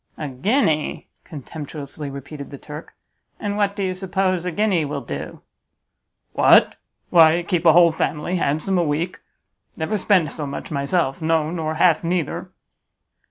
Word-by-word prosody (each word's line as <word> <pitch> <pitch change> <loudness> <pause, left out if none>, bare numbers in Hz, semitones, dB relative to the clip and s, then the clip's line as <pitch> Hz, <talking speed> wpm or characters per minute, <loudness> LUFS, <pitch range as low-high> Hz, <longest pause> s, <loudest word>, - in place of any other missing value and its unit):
"A 150 - -4
guinea?" 155 - 0
contemptuously 145 -1 -8
repeated 140 +1 -8
the 140 - -9
Turk, 150 +3 -10 0.4
"and 205 -1 -2
what 205 -1 0
do 200 - -2
you 185 -1 -1
suppose 185 -1 -1
a 180 - -1
guinea 195 -2 +1
will 145 -1 -4
do?" 70 - -7 0.9
"What? - - +5 0.4
Why, 165 0 +6
keep 175 -1 0
a 160 - +8
whole 170 0 +6
family 160 +2 -2
handsome 155 +5 0
a - - +2
week; 160 +3 -2 0.6
never 205 +7 -1
spend 180 -7 +2
so 150 -2 -5
much 140 +4 -6
myself; 140 +1 0
no, 160 -1 +1
nor 160 -2 -3
half 165 -1 +3
neither." 170 -3 -2
160 Hz, 150 wpm, -22 LUFS, 150-180 Hz, 0.9 s, a